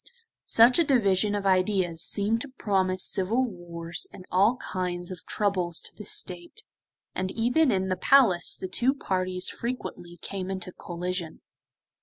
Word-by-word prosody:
Such 235 +6 +6
a - - +6
division 210 - +2
of 200 -1 -3
ideas 185 -3 +1
seemed 220 +3 +1
to 285 - -3
promise 190 -7 0
civil 220 +7 +1
wars 170 -5 -5
and 185 - -12
all 200 +6 +4
kinds 180 -4 -4
of 180 - -9
troubles 185 -5 -1
to - - -12
the 210 - -10
State, 180 - -1 0.5
and 185 0 -2
even 245 +9 +2
in 190 -4 +1
the 185 - +1
Palace 210 -8 +4
the 185 - -4
two 245 +9 +1
parties 185 -6 -1
frequently 230 -8 -5
came 190 0 -5
into 185 -1 -4
collision. 175 -1 -5
190 Hz, 150 wpm, -27 LUFS, 180-225 Hz, 0.5 s, Such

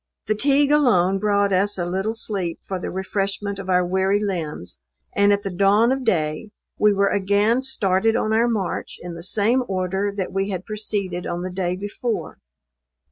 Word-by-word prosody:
Fatigue 275 +7 +2
alone 195 -11 +3
brought 200 -1 +2
us 200 +2 +1
a 175 - -1
little 190 +5 -2
sleep 195 -6 -2
for 190 -1 -4
the - - -4
refreshment 195 +1 -2
of 190 -1 -7
our 180 -1 +3
weary 190 +2 +1
limbs; 170 - -4 0.4
and 200 0 +4
at 200 0 +1
the 195 - -3
dawn 200 +6 +4
of 265 0 -1
day 160 -2 0 0.3
we 210 - +5
were 200 0 +2
again 205 +5 +2
started 220 -4 +1
on 220 -2 0
our 230 +2 +3
march 210 -6 -2
in 175 0 -7
the 170 - -8
same 215 +7 +2
order 190 +1 -1
that 200 -2 -4
we 195 +1 -1
had 185 -2 -4
proceeded 205 -4 -3
on 175 - -3
the 185 +1 -4
day 180 -1 -1
before. 205 +4 -4
200 Hz, 180 wpm, -22 LUFS, 185-215 Hz, 0.4 s, we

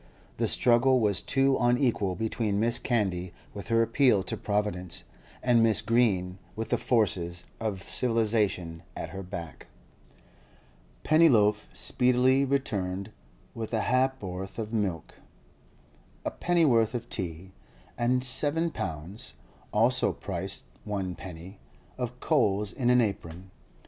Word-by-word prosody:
The - - +1
struggle 125 +2 +4
was 105 -4 +2
too 135 0 +2
unequal 120 -6 +2
between 110 -1 -1
Mrs. 115 +2 +1
Candy 95 -7 -1 0.2
with 100 -3 -7
her 115 0 +3
appeal 115 -4 +3
to - - -3
Providence, 100 -4 -2 0.4
and 120 -2 +4
Mrs. 110 -2 +3
Green 95 -6 +1 0.2
with 110 +1 -4
the - - +3
forces 90 -7 0 0.2
of 105 -4 -3
civilisation 105 -9 0
at - - -5
her 95 - -6
back. 85 -3 -8 1.4
Pennyloaf 115 -10 +4
speedily 125 +1 +2
returned 100 -9 -2 0.4
with 115 0 -4
a 110 - +1
ha'p'orth 100 -7 -1
of 110 0 -4
milk, 95 -7 -2 1.1
a - - -1
pennyworth 130 -11 +2
of 120 0 -4
tea, 90 -3 -5 0.4
and 125 +1 +1
seven 150 +6 0
pounds 90 - -6 0.4
(also 120 +4 +3
price - - -3 0.2
one 95 -3 -3
penny) 90 +2 -10 0.4
of 125 0 -4
coals 105 -9 +1
in 125 -2 0
an 125 0 +5
apron. 95 -4 -4
110 Hz, 120 wpm, -28 LUFS, 95-125 Hz, 1.4 s, an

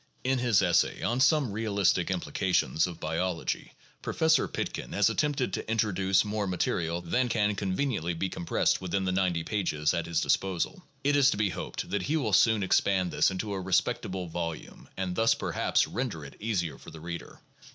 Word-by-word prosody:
In 130 0 +1
his 120 -5 +3
essay 90 -2 +2
on 120 +2 0
"Some 140 -3 +3
Eealistic 100 -3 +1
Implications 80 -4 0
of 85 -2 -8
Biology," 80 +3 -2 0.3
Pro - - -4
fessor 160 0 +3
Pitkin - - -4
has - - +3
attempted 145 -4 0
to - - -4
introduce 100 -3 +2
more 105 -1 -2
material 85 -2 -1
than 125 +9 0
can 105 -2 +1
con 95 -2 -2
veniently 95 - -1
be 95 - 0
compressed 85 0 0
within 95 +1 -1
the 95 - +1
90 90 -3 +1
pages 85 -7 0
at 85 -1 -2
his 85 -1 0
disposal. 95 - 0 0.2
It 145 +1 +3
is 140 -1 +5
to - - -1
be 105 -2 +1
hoped 90 - -5
that 100 -1 0
he 155 +10 0
will 115 -9 -1
soon 110 +2 +4
expand 95 -1 +2
this - - +3
into 100 +2 -3
a 95 - -3
respectable 95 0 0
volume 85 -1 -6
and 95 -1 -2
thus, 115 0 +3
perhaps, - - 0
render 115 - -4
it 70 - -11
easier 95 -7 -2
for - - -12
the 80 - -11
reader. 85 +1 -7
95 Hz, 185 wpm, -28 LUFS, 85-115 Hz, 0.3 s, is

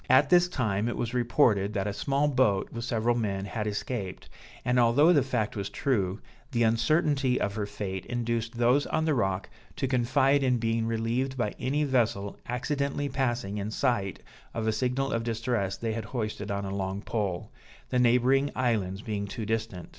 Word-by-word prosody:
At 135 +4 +5
this 175 0 +6
time 115 - -1
it - - -3
was 120 0 -2
reported, 115 -5 +2
that 100 -2 -1
a 105 - -2
small 140 +6 +1
boat, 125 -9 +2
with 115 0 -4
several 120 0 +1
men, 100 -5 -1
had 105 0 -3
escaped; 105 -2 -4 0.4
and 125 0 +3
although 135 +9 +5
the 145 - +5
fact 120 -5 -1
was 100 -2 -3
true, 100 -7 0 0.3
the 120 -2 +2
uncertainty 130 +3 +2
of 100 - -1
her 105 -1 -3
fate 95 -3 -5
induced 115 -1 -2
those 125 +4 +3
on 160 0 0
the 155 - +2
rock 95 -6 0 0.3
to 135 - -1
confide 130 +2 +3
in 130 -2 +2
being 115 0 0
relieved 115 +4 -1
by 105 -4 -1
any 140 +4 0
vessel 115 -7 0
accidentally 140 +3 -1
passing 120 -6 -1
in 100 +1 -3
sight 110 -5 -1 0.3
of 115 -1 -2
a 110 - +2
signal 125 +5 0
of 115 0 0
distress 115 -4 -1
they 115 -1 -2
had 110 -1 -4
hoisted 105 -2 -4
on 100 0 -2
a 95 - -4
long 100 +1 -3
pole; 100 -6 -2 0.4
the 125 - +1
neighboring 125 +3 +4
islands 105 -6 0
being 100 -2 -3
too 110 +2 -5
distant. 110 -5 -3
115 Hz, 185 wpm, -28 LUFS, 105-130 Hz, 0.4 s, this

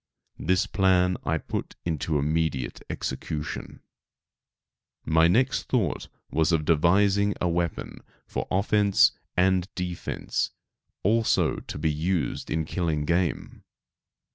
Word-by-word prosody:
This 95 +4 +2
plan 95 -2 +3
I 80 - +1
put - - -5
into 80 -2 -1
immediate 75 -2 -1
execution. 75 0 -5 1.2
My 80 +1 +4
next 120 +9 +2
thought - - 0 0.2
was 80 +1 +2
of 80 -2 +1
devising 100 +6 +3
a 90 - +1
weapon 85 -1 -2 0.3
for - - -4
offence 100 +1 +4 0.3
and 95 0 +3
defence, 90 -1 -2 0.5
also 110 +3 +2
to - - -7
be 80 +1 +1
used 85 +2 -1
in 80 0 0
killing 80 -3 -1
game. 85 +2 -1
85 Hz, 110 wpm, -26 LUFS, 80-95 Hz, 1.2 s, My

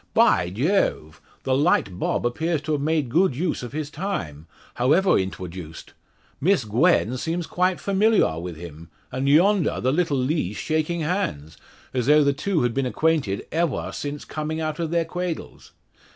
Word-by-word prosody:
"By 85 - +4
Jawve! 100 - 0 0.2
The 130 - +1
Light 130 - +1
Bob - - -1
appears 160 +5 -1
to 155 - -3
have 150 -2 0
made 155 -2 +1
good 160 +3 +2
use 165 +3 -1
of 120 - -7
his 150 0 -4
time 85 - -4 0.3
however 155 +10 +3
intwoduced. 90 -3 -5 0.5
Miss 175 - +2
Gwen 125 - +2
seems 165 +5 -2
quite 180 +1 0
familiaw 200 - +2
with 90 -1 -6
him; 85 -1 -10 0.2
and 130 +2 -2
yondaw 180 +4 +3
the 130 +2 +1
little 165 -3 +1
Lees 130 - -1
shaking 160 +2 -1
hands, 150 - -2 0.4
as 125 -1 -1
though 150 +1 +6
the 140 0 +2
two 160 +2 0
had 120 -1 0
been 135 0 0
acquainted 150 -8 0
evaw 165 -3 -1
since 145 0 -5
coming 155 +1 -4
out 155 -1 -3
of 165 -2 -1
their 170 0 +1
cwadles! 175 0 -5
150 Hz, 165 wpm, -24 LUFS, 115-170 Hz, 0.5 s, though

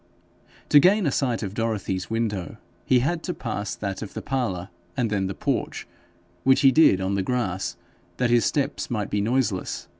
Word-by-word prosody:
To 145 - +8
gain 195 +5 +4
a 140 - +2
sight 125 -5 0
of 100 -1 -4
Dorothy's 105 -5 -2
window 110 -6 -2 0.3
he 125 -1 +4
had 160 +5 0
to 180 - -4
pass 105 -4 -4
that 100 -2 -4
of 105 - -7
the - - -4
parlour, 110 -9 -2 0.3
and 120 -4 0
then 95 -2 0
the 95 - -5
porch, - - -2 0.6
which 130 0 +4
he 135 -2 +7
did 155 -11 +5
on 95 +1 -1
the 100 - +1
grass, 95 -4 -2 0.4
that 125 -1 +1
his 120 -1 +4
steps 140 -2 -1
might 105 -4 -2
be 105 - +1
noiseless. 110 -4 -1
115 Hz, 185 wpm, -25 LUFS, 95-130 Hz, 0.6 s, To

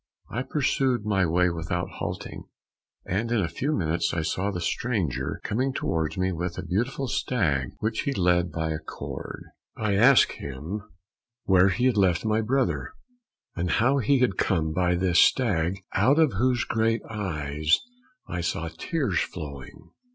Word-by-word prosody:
I 120 - -2
pursued 130 -4 0
my 95 -4 +2
way 90 +2 +2
without 85 +1 -2
halting, - - -5 0.6
and 110 +6 -1
in 120 - +2
a 90 - +1
few 140 - -2
minutes 85 - 0
I 80 - 0
saw 95 +5 -1
the 95 -3 -3
stranger 85 - -1
coming 130 +5 -1
towards 80 -6 -1
me 95 0 +1
with 90 0 -3
a 95 - -4
beautiful 120 +10 -1
stag 75 - 0
which 110 +1 -2
he 140 - -1
led 90 -5 +2
by 80 -1 -2
a 80 - -2
cord. 80 - -7 0.3
I 105 -2 0
asked 120 +7 +6
him 75 +10 -5 0.6
where 95 0 +5
he 120 +6 0
had 125 -4 +3
left 95 -1 +2
my 110 0 +2
brother, 95 - 0 0.6
and 90 0 -1
how 130 +8 +3
he 135 +3 +3
had 110 -7 +2
come 80 -4 +1
by 90 +1 +2
this 90 0 +2
stag, 95 -8 +3 0.2
out 140 +4 +4
of 160 -4 +4
whose 125 +4 +1
great 115 0 0
eyes 80 -7 0 0.5
I 90 - -3
saw 85 -1 -2
tears 105 - -1
flowing. 70 -6 -7
95 Hz, 160 wpm, -26 LUFS, 85-115 Hz, 0.6 s, asked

